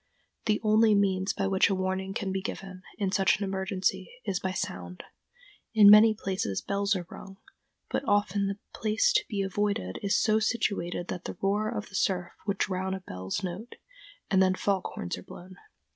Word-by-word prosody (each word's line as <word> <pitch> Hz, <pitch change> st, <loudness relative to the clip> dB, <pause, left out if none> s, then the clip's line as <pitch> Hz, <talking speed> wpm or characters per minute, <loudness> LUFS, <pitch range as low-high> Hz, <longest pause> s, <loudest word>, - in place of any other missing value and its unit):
The 210 Hz, -1 st, +2 dB
only 215 Hz, 0 st, +5 dB
means 195 Hz, -1 st, +1 dB
by 195 Hz, -, -2 dB
which 195 Hz, 0 st, +3 dB
a 195 Hz, -, +1 dB
warning 190 Hz, +1 st, -2 dB
can 200 Hz, -4 st, -2 dB
be 190 Hz, 0 st, -2 dB
given, 190 Hz, -1 st, -7 dB, 0.2 s
in 195 Hz, -3 st, -1 dB
such 195 Hz, -1 st, +3 dB
an 205 Hz, -, -4 dB
emergency, 190 Hz, -1 st, -1 dB, 0.2 s
is 195 Hz, -4 st, -1 dB
by 190 Hz, -, -2 dB
sound. 90 Hz, -, -5 dB, 0.7 s
In 205 Hz, -2 st, +9 dB
many 215 Hz, +1 st, +8 dB
places 190 Hz, -, -2 dB
bells 200 Hz, +1 st, 0 dB
are 180 Hz, -2 st, -4 dB
rung, 195 Hz, 0 st, -10 dB, 0.5 s
but -, -, -2 dB
often 205 Hz, -1 st, +2 dB
the 195 Hz, 0 st, -3 dB, 0.2 s
place 220 Hz, -, +1 dB
to -, -, +3 dB
be 200 Hz, -3 st, -1 dB
avoided 195 Hz, -, -2 dB
is 200 Hz, -, +2 dB
so 215 Hz, 0 st, +3 dB
situated 200 Hz, -6 st, -1 dB
that 180 Hz, -, -5 dB
the -, -, -6 dB
roar 205 Hz, +2 st, +1 dB
of 215 Hz, -2 st, -5 dB
the 190 Hz, -, -10 dB
surf 180 Hz, -2 st, 0 dB, 0.2 s
would 200 Hz, -1 st, 0 dB
drown 190 Hz, 0 st, -1 dB
a 190 Hz, -, -7 dB
bell's 95 Hz, -, -5 dB
note, 190 Hz, +7 st, -6 dB, 0.6 s
and 190 Hz, -1 st, +4 dB
then 185 Hz, 0 st, +3 dB
fog 195 Hz, -1 st, 0 dB
horns 85 Hz, 0 st, -4 dB
are -, -, -10 dB
blown. 185 Hz, -, -12 dB
195 Hz, 190 wpm, -28 LUFS, 185-205 Hz, 0.7 s, In